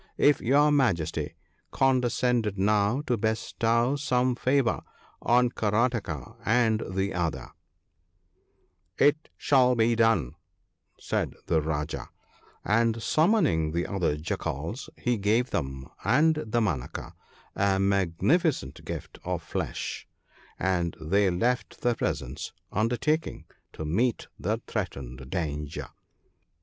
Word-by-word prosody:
If 145 - +4
your 145 +5 +4
Majesty 85 - +1 0.3
condescended 125 -4 +1
now 105 +5 +2
to 125 -5 +1
bestow 115 +3 +1
some 130 -3 +1
favour 130 +1 +1 0.4
on 125 +1 +4
Karataka 105 - -1
and 110 -1 +2
the 95 +1 0
other 85 -3 -2 0.5
' - - -44 0.2
' - - -45
It 150 +2 0
shall 125 -3 +4
be 115 0 +3
done/ 115 - +2 0.7
said - - -2
the 80 -2 +2
Rajah; 75 -1 -3 0.6
and, 115 +2 +2
summoning 155 - +2
the 85 +1 0
other 90 -7 0
Jackals, 80 - -4
he 120 -3 0
gave 110 +5 +1
them 65 -3 -3 0.2
and 150 +9 +4 0.2
Damanaka 105 - -2 0.4
a 95 -1 +2
magni 95 - +2
ficent 145 - -2
gift - - -7
of - - -3
flesh, - - -4 0.5
and 90 -3 0
they 95 +5 +2
left 120 +8 -1
the 120 - +2
presence, 65 - -3 0.2
undertaking 125 - 0 0.3
to 80 - -6
meet 115 +10 0
the - - -1
threatened 65 0 -5
danger. 75 -4 -3
110 Hz, 115 wpm, -27 LUFS, 85-125 Hz, 0.7 s, If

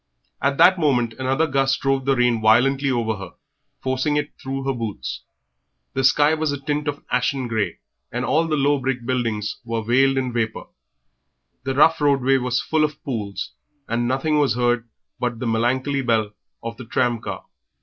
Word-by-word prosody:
At 140 +1 +1
that 185 0 +6
moment 125 -7 +2
another 135 +4 +1
gust 135 -2 +1
drove 135 -1 0
the 135 0 +3
rain 120 -2 +2
violently 135 +6 +4
over 115 -4 0
her, 95 -3 -9 0.5
forcing 130 +3 0
it 145 0 -2
through 135 0 -4
her 135 0 0
boots. 110 - -5 0.7
The 135 - -1
sky 145 +4 +4
was 155 -1 0
a 145 - -3
tint 145 +1 -2
of 145 0 -3
ashen 125 0 0
grey, 110 -6 -1 0.3
and 120 +1 -2
all 160 +4 +2
the 155 -1 0
low 145 0 +2
brick 125 -2 -2
buildings 115 -5 -1
were 115 -1 -3
veiled 135 +4 +3
in 130 -2 -1
vapour; 115 -2 -2 1.0
the 135 0 -1
rough 155 +3 +5
roadway 135 -2 +3
was 125 -1 0
full 160 -1 +1
of 150 0 -2
pools, 105 -8 -4 0.4
and 120 +1 0
nothing 150 +4 +1
was 140 -5 +2
heard 120 -1 0 0.3
but 120 -1 -1
the 125 - -4
melancholy 130 +5 +1
bell 110 -4 +1 0.3
of 115 0 -5
the 125 - -9
tram 120 +1 0
car. - - -6
130 Hz, 180 wpm, -22 LUFS, 115-140 Hz, 1.0 s, that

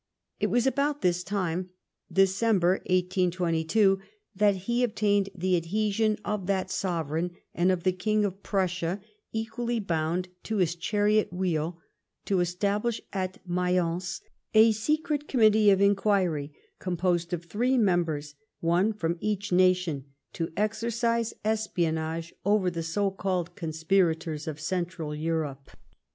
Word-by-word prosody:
It - - +2
was 245 0 +2
about 280 +2 0
this 180 0 +2
time, 185 -2 -2 0.4
December 195 -1 +3
1822, 180 +1 +2 0.4
that 205 0 +4
he 240 +2 +1
obtained 205 -3 +1
the 185 0 +1
adhesion 210 +5 +1
of 205 -3 -2
that 190 -1 0
sovereign 175 -2 -2 0.2
and 180 +2 +3
of 180 -2 -1
the 185 - +3
King 210 +3 +1
of 195 0 -4
Prussia, 185 -2 -1 0.3
equally 230 +1 -2
Ijound 170 -2 -1 0.2
to 220 - -3
his 175 -3 +2
chariot 210 +4 +1
wheel, 175 -2 -1 0.5
to 195 -2 +1
establish 200 +6 0
at 185 -1 -4
Mayence 180 +1 0 0.3
a 220 +1 +8
secret 300 +6 -1
Committee 215 -4 +5
of 195 -1 +5
Inquiry, 195 -7 +2 0.3
composed 175 -1 0
of 175 -1 -3
three 245 +8 +1
members, 170 -8 +1 0.3
one 175 +6 +2
from 170 -4 -2
each 205 0 -2
nation, 180 -6 +2 0.3
to 165 -1 -3
exercise 230 +2 0
espionage 165 -6 -1
over 200 -2 +2
the 170 -1 -3
so 195 +5 0
called 185 -3 -2
conspirators 160 -2 0
of 155 -1 -4
Central 170 -2 -3
Europe. 150 -3 -3
185 Hz, 125 wpm, -28 LUFS, 170-210 Hz, 0.5 s, a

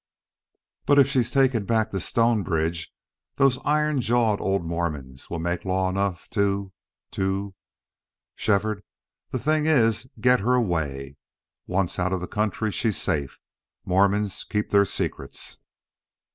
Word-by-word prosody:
But 145 - +5
if 140 - +7
she's 130 -4 +1
taken 130 -6 +2
back 110 -1 +1
to 95 - -2
Stonebridge 85 -9 0 0.4
those 135 -2 +3
iron 150 -2 +2
jawed 115 -3 +2
old 95 -2 0
Mormons 75 -6 -4
will 85 - -3
make 85 +1 -2
law 95 0 0
enough 95 -2 -2
to 100 -2 0 0.4
to... 95 +1 -2 0.8
Shefford, 105 0 0 0.5
the - - -2
thing 155 +4 +1
is 115 -5 +2
get 125 +3 +4
her 125 +5 +2
away. 75 - -1 0.5
Once 95 -1 -1
out 90 +1 0
of 95 - 0
the 90 - -4
country, 105 +1 -1
she's 105 +2 -1
safe. 70 -3 -2 0.5
Mormons 100 +2 +1
keep 105 -1 -2
their 100 0 +5
secrets." 70 -6 -4
100 Hz, 130 wpm, -25 LUFS, 90-115 Hz, 0.8 s, if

